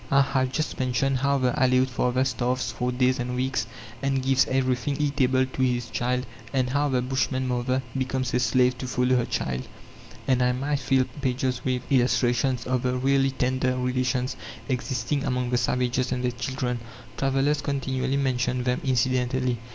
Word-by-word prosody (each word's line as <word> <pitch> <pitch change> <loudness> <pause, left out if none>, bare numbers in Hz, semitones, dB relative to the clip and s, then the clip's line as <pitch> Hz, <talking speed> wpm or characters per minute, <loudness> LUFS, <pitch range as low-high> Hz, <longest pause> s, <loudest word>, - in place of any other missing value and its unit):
I 140 0 +5
have 130 -1 +1
just 155 +3 -2
mentioned 130 +1 +1
how 140 +1 +2
the 130 -2 +2
Aleoute 130 -1 +3
father 125 +1 +1
starves 125 0 -1
for 125 0 -2
days 125 +1 +2
and 125 +1 -2
weeks, 130 -1 -1 0.3
and 135 -1 0
gives 135 0 +3
everything 130 +1 0
eatable 130 -3 +2
to 130 0 -5
his 125 -2 0
child; 125 +1 -1 0.3
and 130 -2 0
how 145 +2 +1
the 125 -2 +1
Bushman 130 0 -1
mother 125 +1 0
becomes 130 -1 -1
a 125 - +3
slave 125 +1 +3
to 130 - -4
follow 125 0 +2
her 120 -1 +2
child; 65 0 -2 0.6
and 130 -1 +3
I 125 0 +3
might 140 +3 -1
fill 130 0 +2 0.2
pages 130 -1 -1
with 130 -1 -1
illustrations 125 -1 +2
of 125 -1 0
the 125 0 0
really 135 +1 +2
tender 130 0 0
relations 125 0 0 0.3
existing 130 +1 -1
among 125 -1 -1
the 125 - +2
savages 125 +1 0
and 125 -1 -1
their 125 - +1
children. 125 0 -3 0.4
Travellers 135 +2 +1
continually 135 -1 -1
mention 125 -2 0
them 125 0 0
incidentally. 130 -1 +1
130 Hz, 170 wpm, -25 LUFS, 125-135 Hz, 0.6 s, I